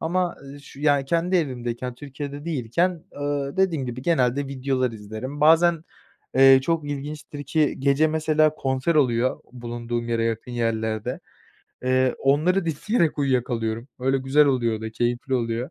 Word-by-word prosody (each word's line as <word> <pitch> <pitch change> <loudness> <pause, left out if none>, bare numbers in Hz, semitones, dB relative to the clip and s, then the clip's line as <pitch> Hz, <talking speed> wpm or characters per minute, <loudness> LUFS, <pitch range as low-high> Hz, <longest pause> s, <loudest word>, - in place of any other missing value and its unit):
Ama, 175 +2 -1
eee, 140 +1 -10
ş 140 -1 -14
yani 145 -2 +3
kendi 170 +5 +1
evimdeyken 125 -5 -3
Türkiye'de 145 +1 -7
değilken, 165 +4 -1 0.2
ııı, 145 +2 -2
dediğim 170 -8 +1
gibi, 125 +1 -6
genelde 140 -3 +1
videolar 130 -2 -1
izlerim. 110 +7 -7
Bazen, 165 +1 +4 0.5
eee, 135 0 +7
çok 165 +1 0
ilginçtir 145 0 -6
ki 150 +2 +1
gece 140 +3 +3
mesela 155 -1 +2
konser 135 +4 -1
oluyor 125 -3 +2
bulunduğum 120 -1 -4
yere 115 -1 0
yakın 115 +1 -3
yerlerde. 110 -2 -2 0.6
Eee, 130 0 +2
onları 160 +8 +2
dinleyerek 165 - 0
uyuyakalıyorum. 120 -3 -1
Öyle 135 +1 +1
güzel 135 +3 +3
oluyor 120 -5 +1
da 110 0 -5
keyifli 120 +3 -1
oluyor. 120 +3 -2
135 Hz, 140 wpm, -24 LUFS, 120-155 Hz, 0.6 s, eee